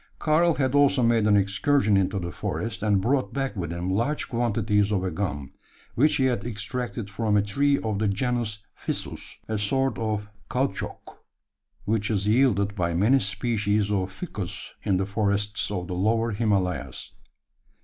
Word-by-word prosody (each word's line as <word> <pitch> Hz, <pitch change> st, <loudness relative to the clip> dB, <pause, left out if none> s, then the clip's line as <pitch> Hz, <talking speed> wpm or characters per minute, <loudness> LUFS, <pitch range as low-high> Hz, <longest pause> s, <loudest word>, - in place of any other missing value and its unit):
Karl 165 Hz, +1 st, +3 dB
had 130 Hz, -2 st, 0 dB
also 140 Hz, -2 st, +4 dB
made 115 Hz, -2 st, +3 dB
an 105 Hz, -1 st, +5 dB
excursion 105 Hz, +3 st, +2 dB
into 95 Hz, +1 st, +1 dB
the 85 Hz, -2 st, -3 dB
forest, 115 Hz, +3 st, -4 dB
and 105 Hz, -2 st, +3 dB
brought 130 Hz, +5 st, 0 dB
back 135 Hz, -2 st, -1 dB
with 85 Hz, -4 st, -3 dB
him 85 Hz, +2 st, -2 dB
large 120 Hz, +10 st, 0 dB
quantities 105 Hz, -3 st, +1 dB
of 95 Hz, -3 st, +1 dB
a 95 Hz, -, -1 dB
gum, 75 Hz, -7 st, -3 dB, 0.4 s
which 150 Hz, +5 st, +3 dB
he 135 Hz, -, +1 dB
had 125 Hz, -6 st, +1 dB
extracted 115 Hz, +1 st, -4 dB
from 105 Hz, 0 st, 0 dB
a -, -, +4 dB
tree 140 Hz, +7 st, +2 dB
of 110 Hz, -3 st, -2 dB
the 110 Hz, -, +1 dB
genus 110 Hz, 0 st, -1 dB
ficus -, -, -5 dB
a 110 Hz, -1 st, -2 dB
sort 135 Hz, +6 st, 0 dB
of 105 Hz, -2 st, -2 dB, 0.2 s
caoutchouc 135 Hz, +2 st, -3 dB, 0.7 s
which 105 Hz, 0 st, 0 dB
is 100 Hz, -3 st, 0 dB
yielded 105 Hz, -4 st, +3 dB
by 85 Hz, -3 st, -1 dB
many 110 Hz, +10 st, +4 dB
species 105 Hz, -1 st, 0 dB
of 95 Hz, -2 st, 0 dB
ficus 95 Hz, -, -6 dB
in 95 Hz, -, +1 dB
the 95 Hz, -, 0 dB
forests 105 Hz, 0 st, -1 dB
of 90 Hz, -3 st, -3 dB
the 90 Hz, -, -5 dB
Lower 115 Hz, +5 st, +1 dB
Himalayas. 100 Hz, -4 st, -1 dB
105 Hz, 165 wpm, -26 LUFS, 100-120 Hz, 0.7 s, an